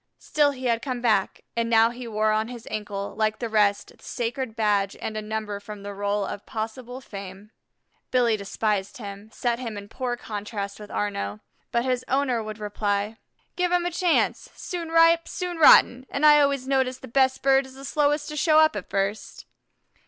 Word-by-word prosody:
Still 295 -1 +2
he 260 -2 -6
had 230 -1 +1
come 255 -2 -3
back; 220 -5 +1
and 230 0 0
now 225 0 +5
he 245 0 -8
wore 215 -1 +1
on 215 +1 +1
his 240 -2 -9
ankle, 205 -2 -4
like 215 0 0
the 235 - -3
rest, 210 -2 +1
the - - -24
sacred 240 0 -3
badge 205 -3 +1
and 215 - -4
a 215 - -2
number 215 -1 -4
from 205 0 -9
the 205 0 -6
roll 205 0 -1
of 205 - -7
possible 235 +3 -5
fame. 200 -1 -9 0.6
Billy 240 -3 +3
despised 200 -1 -2
him, 205 -2 -9
set 240 +1 -1
him 230 -4 -5
in 200 0 -8
poor 245 +2 -3
contrast 205 -2 -5
with 210 -1 -10
Arnaux, 105 - -3 0.3
but 235 +1 +1
his 255 -1 0
owner 260 -3 +1
would 215 -1 -6
reply: 205 0 -2 0.4
"Give 360 -1 0
him 355 -1 +2
a 350 - -1
chance;'soon 345 0 -1
ripe, 330 0 +5
soon 360 -2 -4
rotten,' 260 -4 +6
an' 280 - -3
I 300 -1 +8
always 280 -2 +1
notice 265 -2 +1
the - - -11
best 260 +2 +2
bird 270 0 +4
is 260 - -14
the 270 +1 -10
slowest 295 +1 +1
to 300 - -6
show 310 +1 +3
up 315 -5 +5
at 205 - -6
first." 195 +2 -3
230 Hz, 190 wpm, -25 LUFS, 210-265 Hz, 0.6 s, I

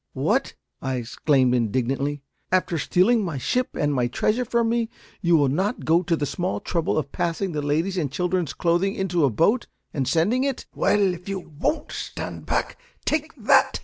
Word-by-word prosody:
"What?" - - 0 0.3
I 130 0 -1
exclaimed, 125 +2 +2
indignantly, 130 +5 0 0.3
"after 180 -3 +1
stealing 210 +9 +3
my 165 -7 -3
ship 250 - -1
and 145 -1 +1
my 125 -3 +1
treasure 215 - 0
from 235 -1 +1
me, 230 -1 0 0.3
will 170 - -1
you 140 - +4
not 190 - -1
go 165 +2 +4
to 175 -2 +1
the 150 - -1
small 180 +6 -2
trouble 165 -3 -1
of 145 -2 -2
passing 175 +3 -1
the 150 -2 -2
ladies' 160 +7 0
and 145 -5 -1
children's 180 0 -1
clothing 175 +4 +1
into 180 -7 +1
a - - +3
boat, 205 - +2 0.3
and 135 -3 -1
sending 210 +11 +2
it 275 -2 -2
" - - -49
"Well, 200 -3 +2
if 180 +2 -9
you 195 -1 -2
won't 165 - -3
stand - - -6
back, - - -1 0.3
take 310 0 0
that!" - - +4
170 Hz, 185 wpm, -24 LUFS, 145-195 Hz, 0.3 s, you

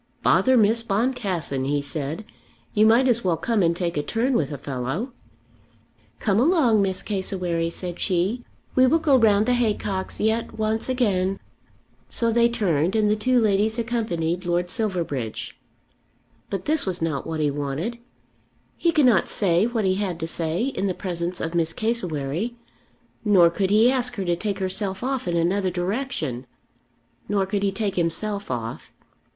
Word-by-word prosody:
"Bother 260 -1 +4
Miss 225 +1 +3
Boncassen," 200 - -1
he 145 +1 +1
said; 145 +6 -5 0.5
"you 215 0 +5
might 240 +4 +5
as 235 -2 +2
well 175 -3 +1
come 220 +5 0
and 170 -1 +2
take 170 -2 -2
a - - +2
turn 235 - 0
with 155 - 0
a 145 - -4
fellow." 140 - -4 1.0
"Come 205 -3 +1
along, 260 - +4
Miss 190 -1 -1
Cassewary," 180 -4 -1
said 175 0 -6
she. 195 +6 0 0.3
"We 255 0 +5
will 320 - +4
go 310 -4 +3
round 215 -4 +4
the 250 - +2
haycocks 210 -5 -1
yet 220 +2 0
once 220 +2 -1
again." 195 -7 +1 0.7
So 230 -1 +1
they 235 +1 +4
turned 185 -6 0
and 210 -1 +3
the - - +3
two 250 +4 +2
ladies 215 +1 +2
accompanied 185 -8 -1
Lord 175 0 0
Silverbridge. 170 - -3 0.9
But 195 -2 -4
this 310 0 +1
was 180 -1 -1
not 150 -5 -2
what 160 -1 -3
he 150 -1 +1
wanted. 145 - -3 0.8
He 340 - +2
could 305 -4 +3
not 220 -9 +4
say 185 +1 +2
what 230 -4 -1
he 185 0 +2
had 190 -5 -2
to 165 - -2
say 165 +4 -2
in 220 -7 -1
the 185 - -2
presence 175 -1 -3
of 165 - -3
Miss 165 -1 0
Cassewary, 190 - -1 0.7
nor 185 -5 +5
could 190 +2 0
he 220 +4 +5
ask 250 -2 +1
her 195 -4 -3
to 175 -1 +1
take 200 +2 -2
herself 190 +1 -3
off 265 -5 -2
in 170 -1 0
another 185 +3 +1
direction. 175 - -3 0.8
Nor 200 -2 +1
could 200 +1 -2
he 200 -1 +1
take 195 -1 -2
himself 200 +5 -1
off. 115 -2 -5
195 Hz, 170 wpm, -24 LUFS, 170-230 Hz, 1.0 s, you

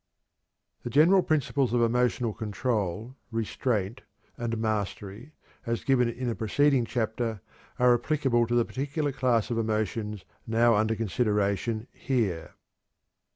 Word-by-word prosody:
The - - -5
general 165 +8 +5
principles 140 -6 0
of 120 - +3
emotional 120 -1 +1
control, 110 0 -2
restraint, 115 -1 -2 0.3
and 115 -1 -3
mastery, 110 +3 -3 0.3
as 115 0 -2
given 125 -3 +3
in 120 +2 -4
a 120 - 0
preceding 130 +3 +2
chapter, 115 -2 -2 0.4
are 125 0 +5
applicable 120 -2 +1
to 120 - 0
the 120 -1 +3
particular 145 +2 -2
class 125 -4 +1
of 115 - 0
emotions 110 -2 -2 0.2
now 115 +1 +4
under 110 +1 +2
consideration 110 0 0
here. 100 -11 -2
115 Hz, 120 wpm, -27 LUFS, 110-125 Hz, 0.4 s, general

